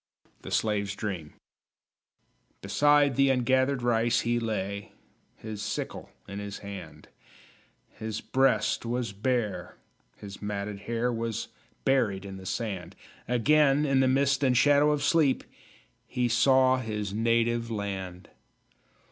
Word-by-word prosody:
THE - - -8
SLAVE'S 100 -2 0
DREAM 95 -8 -5 1.3
Beside 145 -2 +3
the 135 +1 +4
ungathered 130 +1 +2
rice 115 -1 +2
he 120 0 0
lay, 100 -3 -4 0.4
His 110 -2 -7
sickle - - -4 0.2
in 100 +1 -6
his 100 0 -6
hand; 100 -1 -9 0.9
His 110 -1 -4
breast 110 -5 +1
was 120 -1 -2
bare, 105 -4 -2 0.4
his 100 -1 -10
matted 105 0 -4
hair 120 +1 0
Was 115 -1 -3 0.4
buried 105 -8 +1
in 95 -1 -7
the 95 0 -9
sand. 95 -7 -4 0.3
Again, 140 +4 +3
in 135 -2 +2
the 130 - +4
mist 135 +1 +2
and 125 -2 +3
shadow 145 +3 +5
of 150 -1 0
sleep, 155 -4 +3 0.6
He 125 -1 0
saw 130 +2 +4
his 105 -4 -4
Native 115 +1 +1
Land. 95 -4 -5
115 Hz, 120 wpm, -28 LUFS, 100-130 Hz, 1.3 s, shadow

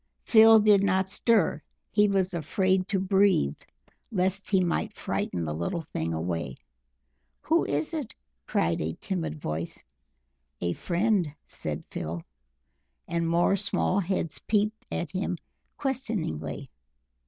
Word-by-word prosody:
Phil 225 0 +8
did 210 -2 +5
not 190 -1 +1
stir; 205 -9 +2 0.3
he 210 0 +4
was 190 -2 +1
afraid 185 +3 +1
to 200 -1 0
breathe 190 - +3 0.6
lest 190 -1 -1
he 195 - +4
might 170 - 0
frighten 85 -2 -2
the 75 - -2
little 85 - -2
thing 80 - -3
away. 80 -4 -2 0.9
"Who 330 +2 +2
is 325 - -1
it?" 295 -8 -4 0.3
cried 85 0 +1
a 80 +1 -2
timid 165 -5 -3
voice. 80 - -4 0.8
"A 85 0 0
friend!" 185 - +1 0.2
said - - -5
Phil. 80 +1 -4 0.8
And 170 -1 0
more 170 +3 +3
small 200 -1 +1
heads 185 -4 -1
peeped 215 0 0
at 170 - -3
him 185 -1 -2 0.4
questioningly. 210 - -3
185 Hz, 125 wpm, -27 LUFS, -, 0.9 s, Phil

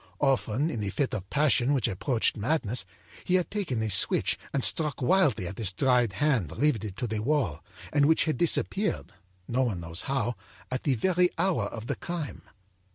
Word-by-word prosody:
âOften, 135 +1 +1
in 115 - -4
a 100 - -2
fit 135 +7 -1
of 95 -2 -5
passion 145 -2 +2
which 130 - +1
approached 115 +5 0
madness, 120 0 -1 0.4
he 185 - +1
had 180 -4 0
taken 160 - -2
a 110 - -1
switch 95 - +3
and 135 - -1
struck 150 -3 +2
wildly 145 - +2
at 95 - -7
this 105 -5 +1
dried 125 0 +2
hand 115 - 0
riveted 110 -9 0
to 125 - -2
the 110 -2 -2
wall, 110 - -1 0.3
and 145 -1 +4
which 160 - +3
had 155 - 0
disappeared, 195 - +1 0.4
no 125 +2 0
one 115 -9 -1
knows 85 0 -3
how, 120 -3 0 0.4
at 130 - -2
the 140 -4 +2
very 180 +8 +2
hour 185 0 +1
of 110 -1 -6
the 140 +2 -2
crime. 170 -3 -5
130 Hz, 185 wpm, -27 LUFS, 110-150 Hz, 0.4 s, and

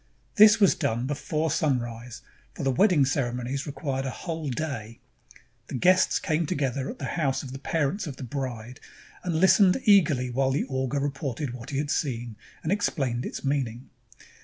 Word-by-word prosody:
This 215 +1 +7
was 200 -4 +5
done 120 -5 -1
before 150 +2 -2
sunrise, 120 -5 -2 0.3
for - - -5
the 135 - +2
wedding 175 - +4
ceremo 125 -2 -1
nies 140 +3 -3
required 140 -2 -3
a - - -1
whole 160 +1 -5
day. 120 -5 -4 0.7
The - - -6
guests 185 +8 +4
came 160 -2 -1
together 135 -2 -1
at - - -7
the 140 - -5
house 140 -3 -1
of 130 - -8
the 135 - -7
parents 160 +6 -1
of 140 - -6
the - - -7
bride 125 -2 -5 0.4
and 175 -3 -2
Hstened 190 +4 +5
eagerly 155 - +4
while 135 +2 +1
the 135 +2 0
augur 130 +1 -2
reported 140 -1 -3
what 120 -2 -9
he 140 - -3
had 145 +1 -1
seen, 120 -5 -2 0.3
and 160 - -1
ex 205 +1 +2
plained 125 -5 -2
its - - -7
meaning. 130 -4 -2
140 Hz, 180 wpm, -26 LUFS, 125-155 Hz, 0.7 s, This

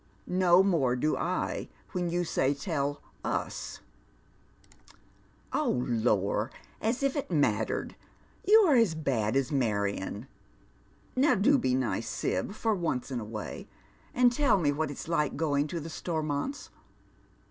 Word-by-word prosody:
*' - - -33 0.3
No 180 +2 +8
more 155 -11 +2
do 150 +5 +1
I - - -2 0.2
when 180 -1 -1
you 175 +1 0
say 140 -4 +1
tell 145 -1 -2 0.2
us." - - -3 0.8
" - - -28 0.7
Oh, 125 0 +1
lor, 110 -2 +1 0.3
as 235 +5 0
if 275 +1 +1
it 285 - -3
mattered 150 -5 0
I - - -30
You're 415 -10 +7
as 220 -9 +3
bad 125 -7 0
as 135 0 +1
Marion. 100 -4 -1 0.9
Now 275 +4 +4
do 270 +8 +4
be 130 - +1
nice. 115 -3 -1
Sib, - - -2
for 220 +1 0
once 160 -9 -2
in 125 - -2
a - - -5
way, 105 0 -6 0.4
and 245 -1 +4
tell 265 -3 +3
me 150 -6 +2
what 155 +1 -1
it's 145 - -7
like 150 -5 0
going 145 -2 +1
to 170 +3 -4
the 160 - -7
Stormonts. 160 - -3
150 Hz, 145 wpm, -29 LUFS, 125-190 Hz, 0.9 s, No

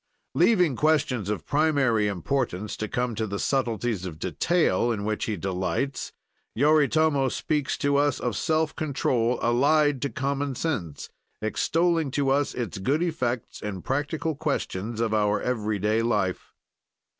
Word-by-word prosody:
Leaving 180 - +3
questions 130 -8 +1
of 105 - -3
primary 140 -8 +2
importance 105 - -2
to 110 - -4
come 125 +2 -1
to 110 0 -2
the 100 0 -3
subtleties 115 -5 -1
of 85 -4 -6
detail 120 - +1
in 105 -3 -2
which, 110 0 -1
he 110 -2 -2
delights, 95 - -2 0.4
Yoritomo 150 0 +3
speaks 150 +2 -1
to 140 0 +1
us 145 -2 +2
of 120 -4 -2
self 160 - 0
control 125 -5 0
allied 145 +3 +3
to 140 - -1
common 140 0 -2
sense, 100 - -3 0.3
extolling 165 +8 +1
to 135 0 0
us 145 +1 +1
its 115 -5 -4
good 140 - +1
effects 130 -8 -2
in 100 -3 -5
practical 150 +4 -1
questions 120 - -3
of 115 -2 0
our 105 -1 +2
every 110 -4 -1
day 105 +3 +1
life. 95 -6 -1
125 Hz, 145 wpm, -26 LUFS, 110-145 Hz, 0.4 s, Leaving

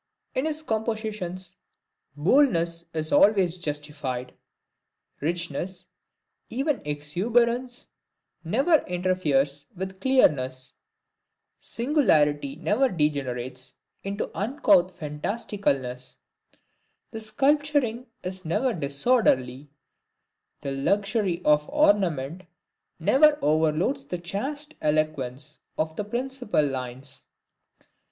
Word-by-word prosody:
In 265 +4 0
his 310 0 -2
compositions, 215 - -3 0.6
boldness 170 - +2
is 155 -1 -2
always 190 -4 +4
justified; 145 -5 -4 0.9
richness, 170 +3 -3 0.6
even 275 +3 -1
exuberance, 235 - 0 0.6
never 270 - +3
interferes 155 -6 0
with 190 +1 -6
clearness; 130 - +2 0.9
singularity 150 - +2
never 210 - +1
degenerates 130 - -2 0.3
into 200 +1 -3
uncouth 195 - +2
fantasticalness; 150 - -2 0.9
the 225 - -6
sculpturing 270 +1 +1 0.2
is 185 +1 -4
never 240 +10 0
disorderly; 140 - +1 0.9
the 140 - -4
luxury 195 - 0
of 150 0 +3
ornament 185 - +2 0.6
never 295 +2 +5
overloads 160 - +1
the 180 - -3
chaste 275 - -3
eloquence 150 -2 -1 0.2
of 160 0 -1
the 210 - -2
principal 245 - -1
lines. 130 0 -5
180 Hz, 80 wpm, -26 LUFS, 150-235 Hz, 0.9 s, never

